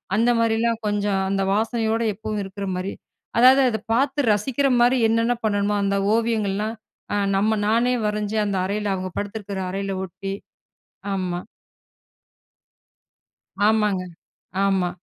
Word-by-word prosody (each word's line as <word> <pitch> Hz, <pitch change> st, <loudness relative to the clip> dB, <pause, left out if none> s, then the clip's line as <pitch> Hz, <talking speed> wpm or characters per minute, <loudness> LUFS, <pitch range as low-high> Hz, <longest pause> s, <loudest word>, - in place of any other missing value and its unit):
அந்த 230 Hz, +3 st, +3 dB
மாரிலாம் 230 Hz, 0 st, +1 dB
கொஞ்சம் 205 Hz, -1 st, 0 dB
அந்த 195 Hz, 0 st, 0 dB
வாசனையோடு 225 Hz, +1 st, 0 dB
எப்பவும் 215 Hz, 0 st, -4 dB
இருக்குற 195 Hz, +1 st, -6 dB
மாரி, 185 Hz, +2 st, -3 dB, 0.5 s
அதாவது 260 Hz, +2 st, +7 dB
அத 220 Hz, -, -2 dB
பாத்து 275 Hz, +4 st, +1 dB
ரசிக்கிற 265 Hz, +7 st, 0 dB
மாரி 245 Hz, +2 st, +4 dB
என்னென்ன 230 Hz, +2 st, +2 dB
பண்ணணுமோ, 205 Hz, -1 st, +1 dB
அந்த 200 Hz, 0 st, +1 dB, 0.2 s
ஓவியங்கள்லாம் 220 Hz, -1 st, 0 dB, 0.4 s
அ -, -, +1 dB, 0.2 s
நம்ம 210 Hz, +3 st, +2 dB, 0.2 s
நானே 235 Hz, +3 st, +2 dB
வரைஞ்சு 210 Hz, 0 st, -1 dB
அந்த 200 Hz, -2 st, -1 dB
அறையில 205 Hz, +1 st, -2 dB
அவங்க 185 Hz, 0 st, -4 dB
படுத்துருக்குற 205 Hz, -1 st, -4 dB
அறையில 195 Hz, +1 st, -3 dB
ஒட்டி 195 Hz, +2 st, -6 dB, 0.8 s
ஆமா. 180 Hz, -2 st, -2 dB, 2.3 s
ஆமாங்க 210 Hz, -3 st, +2 dB, 0.6 s
ஆமா 190 Hz, -2 st, +1 dB
210 Hz, 120 wpm, -23 LUFS, 195-230 Hz, 2.3 s, அதாவது